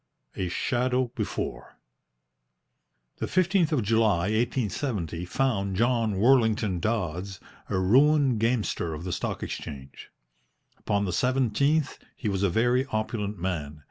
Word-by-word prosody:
A 95 - -2
SHADOW 125 +4 0
BEFORE - - -4 1.4
The - - -3
15th 185 -2 +2
of 140 -7 +1
July, 105 -4 +2
1870, 110 - -1
found 100 -3 0
John 115 -1 +1
Worlington 110 -4 +3
Dodds 95 -2 -2 0.3
a - - 0
ruined 130 +5 +4
gamester 110 -8 0
of 75 - -8
the 90 -1 -3
Stock - - -3
Exchange. 70 -1 -7 0.7
Upon 100 -1 0
the 90 - -2
17th 135 - +1 0.2
he 115 - -5
was 95 -1 -1
a 100 - +3
very 120 +7 +2
opulent 110 -3 -3
man. 80 -5 -4
110 Hz, 120 wpm, -27 LUFS, 95-125 Hz, 1.4 s, ruined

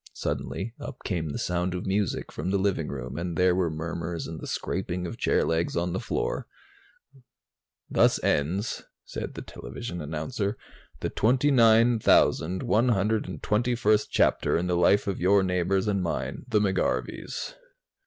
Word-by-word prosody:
Suddenly, 115 +4 -3
up - - -8
came 85 -5 -2
the 70 - -4
sound 90 +1 -1
of 90 - -4
music 100 0 -1
from 80 +5 -4
the 100 - +2
living 95 -5 0
room 65 +1 -5
and 85 -1 -3
there 90 +1 +4
were 90 -2 +1
murmurs 85 +1 -4
and 80 -1 -6
the - - -6
scraping 90 -1 -3
of 85 - -6
chair - - +2
legs 80 +1 0
on 85 +1 0
the 95 - -1
floor. - - -2 1.4
"Thus - - +4
ends," 90 +9 0 0.2
said - - -6
the - - -6
television 90 -7 -7
announcer, 90 - -3 0.4
"the - - -2
29,121st 110 - +3
chapter - - +2
in 85 - -1
the 90 -1 +1
life 90 +4 +4
of 100 -2 -2
your 95 +2 +4
neighbors 95 +2 +1
and 100 -2 +1
mine, 85 - -3
the 110 -4 +2
McGarveys." 100 - -1
95 Hz, 145 wpm, -27 LUFS, 85-105 Hz, 1.4 s, there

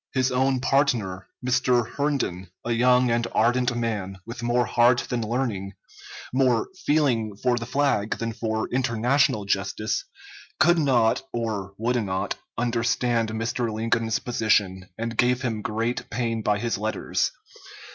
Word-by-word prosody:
His 130 0 +2
own 130 0 +1
partner, 115 -10 +1 0.2
Mr. 125 -2 +2
Herndon, 135 - -2 0.2
a 120 - -1
young 125 +1 +4
and 115 0 +1
ardent 125 +2 +2
man, 105 -5 -2
with 120 +1 -7
more 120 +1 +1
heart 120 +2 +4
than 120 -1 0
learning, 110 -4 -2 0.6
more 130 -3 +2 0.2
feeling 120 -9 +2
for 125 +3 +1
the 115 -1 -4
flag 135 -6 +1
than 115 0 -3
for 110 -1 -2
international 125 -1 +1
justice, 100 +2 -1 0.6
could 175 -1 +5
not, 120 -7 +3
or 105 -4 -3
would 120 +1 0
not, 95 0 -2 0.2
understand 115 0 +1
Mr. 115 +1 -2
Lincoln's 115 0 0
position, 100 -6 0
and 115 +1 -3
gave 125 +1 +2
him 115 -4 -2
great 115 +4 -2
pain 115 -1 -1
by 105 -1 +1
his 115 -2 -2
letters. 110 +1 -1
115 Hz, 135 wpm, -25 LUFS, 110-125 Hz, 0.6 s, could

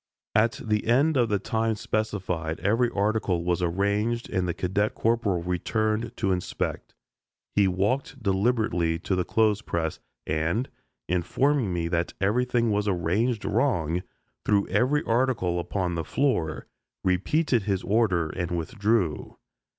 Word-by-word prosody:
At 110 +2 +3
the 105 -1 0
end 140 +7 +3
of 120 -3 +3
the 105 - +2
time 110 +3 -1
specified 95 -7 -2
every 115 +6 +2
article 100 -4 0
was 90 0 0
arranged 100 +7 0
and 90 -1 0
the 85 - -1
cadet 100 +4 0
corporal 110 -6 +1
returned 110 +5 -1
to 100 -4 +1
inspect. 90 -1 -3 0.6
He 100 -1 +4
walked 125 +8 -1
deliberately 95 -5 +1
to 95 +3 -2
the 90 - +1
clothes 110 +1 +2
press, 80 -7 -2 0.3
and, 80 - -1 0.4
informing 115 - +1
me 85 -1 -1
that 85 0 -1
everything 120 +3 +1
was 105 0 0
arranged 100 +6 0
wrong, 90 - +1 0.4
threw 100 -1 +2
every 145 +4 +2
article 115 -8 +1
upon 90 0 -2
the 85 -1 -2
floor, 85 - 0 0.4
repeated 120 - +2
his 100 -2 0
order 95 -7 +2
and 85 -1 -3
withdrew. 95 - -1
100 Hz, 135 wpm, -26 LUFS, 90-115 Hz, 0.6 s, He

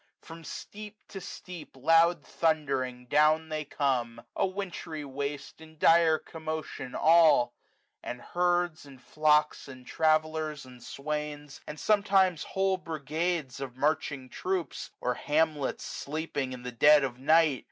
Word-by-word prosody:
From 165 0 -12
steep 210 +6 -9
to 195 - -8
steep, 180 -5 -10
loud 165 +5 +3
thundering 135 -6 -1
down 155 +4 +3
they 155 -1 -3
come, 125 -6 -1
A 195 - +1
wintry 180 -5 -6
waste 140 +2 -5
in 160 0 -15
dire 165 0 +5
commotion 155 -6 -6
all; 160 -7 +5 0.5
And 125 - -6
herds, 175 +2 0
and 140 -3 -14
flocks, 150 +2 +1
and 130 -2 -11
travellers, 155 -2 0
and 125 -1 -14
swains, 150 +1 -5
420 - - -29
And 150 - -11
sometimes 195 -3 +3
whole 190 -1 0
brigades 155 -2 -3
of 130 -2 -7
marching 145 -2 -1
troops. 185 +5 -3
Or 125 - 0
hamlets 150 +1 0
sleeping 145 -3 -4
in 125 -1 -8
the 125 - -5
dead 145 +4 +6
of 125 -2 -3
night. 155 -1 +4
155 Hz, 135 wpm, -29 LUFS, 135-165 Hz, 0.5 s, dead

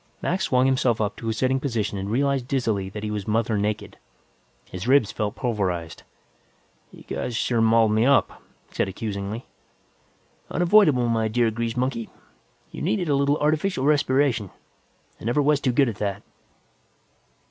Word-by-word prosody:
Mac 185 +2 0
swung 130 -4 +2
himself 130 -3 +2
up 105 -1 -1
to 115 - -4
a - - 0
sitting 130 +3 +1
position 115 -7 -2
and 95 +1 -4
realized 135 +2 0
dizzily 110 -8 -1
that 105 +2 -7
he 105 - -3
was 105 -2 -4
mother 110 +1 +1
naked. 105 +1 -2 0.7
His 90 +5 -6
ribs 130 -5 +4
felt 105 -1 -3
pulverized. 95 -8 -2 0.9
"You - - -14
guys 120 - -4
sure 120 -1 +1
mauled 115 -1 +4
me 110 +1 +2
up," 135 -8 +2 0.3
he - - -24
said - - 0
accusingly. 100 +3 -5 1.0
"Unavoidable, 170 - +4
my 115 -1 +1
dear 115 +1 +1
grease 115 +1 -3
monkey. 125 -3 -2 0.6
You - - -8
needed 155 +10 0
a 145 - +3
little 140 +1 +2
artificial 155 0 0
respiration; 140 -7 +2 0.7
I - - -9
never 120 +5 +1
was 145 0 +2
too 130 - +1
good 135 +2 +3
at 105 - -6
that." 100 -1 -3
115 Hz, 160 wpm, -24 LUFS, 105-135 Hz, 1.0 s, ribs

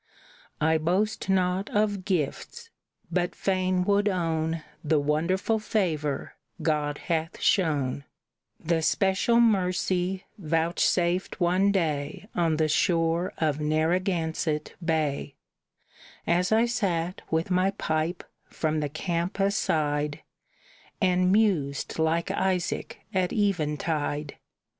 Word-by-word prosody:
"I 160 +1 +3
boast 195 +6 0
not 185 +1 +1
of 205 -3 0
gifts, 195 - -3 0.4
but 180 -1 0
fain 185 -1 +1
would 205 +2 +2
own 165 -3 -1 0.2
The 155 0 +2
wonderful 170 +9 +1
favor 155 -10 -1 0.3
God 150 -2 0
hath 165 -1 -2
shown, 145 -7 +1 0.5
The 165 0 0
special 195 +7 +2
mercy 185 -3 +1
vouchsafed 170 +2 +1
one 185 +3 +3
day 155 -1 -1
On 165 -3 +1
the 155 0 +2
shore 165 +3 +1
of 155 -2 0
Narragansett 160 0 0
Bay, 155 -4 -1 0.9
As 180 +3 +1
I 225 +2 +4
sat, 185 -7 -1
with 160 +3 0
my 185 +1 +3
pipe, 165 -3 -2 0.2
from 155 -1 -1
the 150 -1 -2
camp 170 +5 -2
aside, 150 -7 0 0.8
And 185 -1 +3
mused 175 -11 +1
like 160 +1 +1
Isaac 185 -2 -1
at 185 -1 +1
eventide. 150 -6 -1
170 Hz, 105 wpm, -27 LUFS, 155-190 Hz, 0.9 s, I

